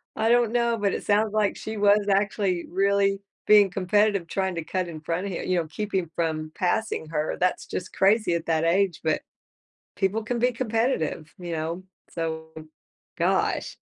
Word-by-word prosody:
I 225 +1 +1
don't 240 -1 +3
know, 235 -1 +2
but 200 -2 0
it - - -3
sounds 210 +1 +2
like 210 -2 +1
she 220 - -6
was 205 0 +4
actually 195 -2 +1
really 195 +1 +2 0.3
being 205 -2 +6
competitive 200 0 +1
trying 190 0 -1
to 165 - -3
cut 185 +1 -2
in 155 -2 -8
front 170 +3 -2
of - - -4
hi - - -3
you 185 -1 0
know, 165 -2 -1
keeping 190 -1 -3
from 155 -2 -2
passing 185 -2 -1
her. 155 -1 -1
That's 180 0 0
just - - -5
crazy 200 -1 +3
at 165 - -3
that 160 -1 +1
age, 180 0 +2
but 160 -1 +1 0.8
people 210 +3 0
can 240 +1 -2
be 250 +2 +3
competitive, 225 - -1
you 175 -2 -6
know, 165 +3 -3 0.3
so, 160 -1 -4 0.7
gosh, - - 0
195 Hz, 175 wpm, -25 LUFS, 170-210 Hz, 0.8 s, being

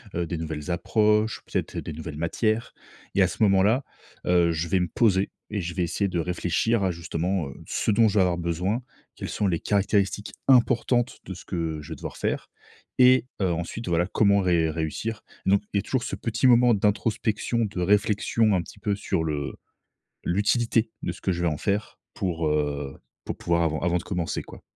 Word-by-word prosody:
heu, 85 0 0
des 85 +1 -4
nouvelles 80 +1 -4
approches, 105 +4 +2
peut-être - - -3
des - - -4
nouvelles 80 0 -7
matières. 110 +8 -1 0.4
Et 100 - +4
à 90 - +5
ce 90 - -1
moment-là, 105 +6 +4 0.4
heu, 85 -1 +4
je 80 +1 -2
vais 95 - +3
me 90 - 0
poser 100 -1 +2 0.2
et 105 - -2
je 85 0 -4
vais 90 - +1
essayer 100 +4 0
de 90 -2 -2
réfléchir 90 +5 0
à, 95 - +1
justement, 85 -1 -2
heu, - - -8
ce - - 0
dont 110 +2 +5
je 105 - 0
vais - - +6
avoir 90 -2 +2
besoin. 90 +7 -1 0.3
Quelles - - -5
sont 105 - 0
les 85 -3 0
caractéristiques 100 0 0 0.2
importantes 120 -1 +3
de 95 - -6
ce 90 - -11
que 80 -4 -3
je 75 - -12
vais - - -5
devoir - - -7
faire? - - -2 0.5
Et, 130 0 +6 0.2
heu, 95 -2 +2
ensuite 85 +7 -4
voilà 85 +1 +2
comment 100 0 +3
ré 85 -4 +2
réussir? 85 +8 -3 0.2
Donc, 100 +1 +4
il - - +2
y - - +4
a - - 0
toujours 130 -3 -1
ce - - -3
petit 115 +3 +1
moment 120 -1 +6
d'introspection, 110 +2 0
de 95 -3 -4
réflexion, 105 +3 +2
un 90 - +1
petit 95 - -13
peu, 100 0 0
sur 85 -4 -1
le 75 -3 -2 0.7
l'utilité 110 +4 +1
de - - -2
ce - - -11
que - - 0
je 85 -1 -2
vais 85 - +2
en 75 -2 -1
faire 100 +6 -2
pour, 85 -4 -1
heu, 75 -2 -1 0.3
pour - - -3
pouvoir 85 0 +1
avant 80 -1 0
avant 90 0 +1
de 85 - -5
commencer, 90 -3 -2
quoi. - - -13
95 Hz, 205 wpm, -25 LUFS, 85-105 Hz, 0.7 s, vais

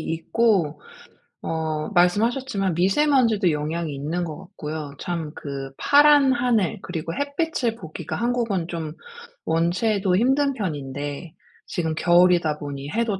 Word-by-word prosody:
있고 165 -3 0 0.6
어 160 -1 -2
말씀하셨지만 200 +2 +2
미세 195 - +2
먼지도 230 - +3
영향이 155 +1 -2
있는 155 +6 -3
것 155 -3 -5
같고요. 155 -6 -7
참 165 -4 -4
그 135 -2 -6
파란 290 -2 +6
하늘 240 -8 +1
그리고 165 -2 -4
햇빛을 285 - -1
보기가 160 -8 -7
한국은 230 -8 -1
좀 160 -3 -4 0.5
원체도 180 +4 +1
힘든 270 +6 +2
편인데 145 - -5 0.3
지금 160 -2 -2
겨울이다 175 -2 +3
보니 140 -1 -6
해도 225 -4 -1
175 Hz, 275 characters per minute, -23 LUFS, 155-230 Hz, 0.6 s, 파란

